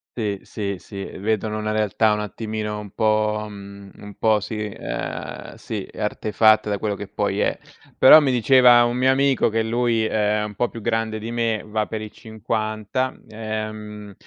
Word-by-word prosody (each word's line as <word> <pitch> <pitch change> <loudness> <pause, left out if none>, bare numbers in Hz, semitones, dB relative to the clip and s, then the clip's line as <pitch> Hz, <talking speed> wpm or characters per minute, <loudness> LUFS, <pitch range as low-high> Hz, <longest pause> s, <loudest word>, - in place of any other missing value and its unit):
Sì, 105 -4 -2
sì, 100 -2 -4
sì, 95 +3 -8
vedono 110 +1 -2
una 110 0 -2
realtà 110 0 +2
un 105 - -1
attimino 105 0 -4
un 105 -2 -8
po' 110 0 +1
mhmm, 100 -1 -11
un 105 0 -11
po' 110 -1 +3
sì, 110 +1 -5
ehm - - -6
sì, - - -6
artefatta 110 +1 +2
da 100 - 0
quello 105 0 -2
che 100 0 -7
poi 100 0 -2
è. - - +1 0.4
Però 150 +4 +9
mi 140 -4 +1
diceva 125 0 +6
un 120 0 0
mio 130 +1 +2
amico 135 -2 +3
che 110 +1 0
lui 115 0 +1
è 105 0 +1
un 105 0 -5
po' 120 +4 -1
più 115 - -9
grande 110 -1 -1
di 115 +2 -6
me, 115 -2 -1
va 110 0 -2
per 110 - -5
i 105 - -8
50, 110 +3 -3 0.2
ehm, 110 -1 -6
110 Hz, 175 wpm, -22 LUFS, 105-115 Hz, 0.4 s, Però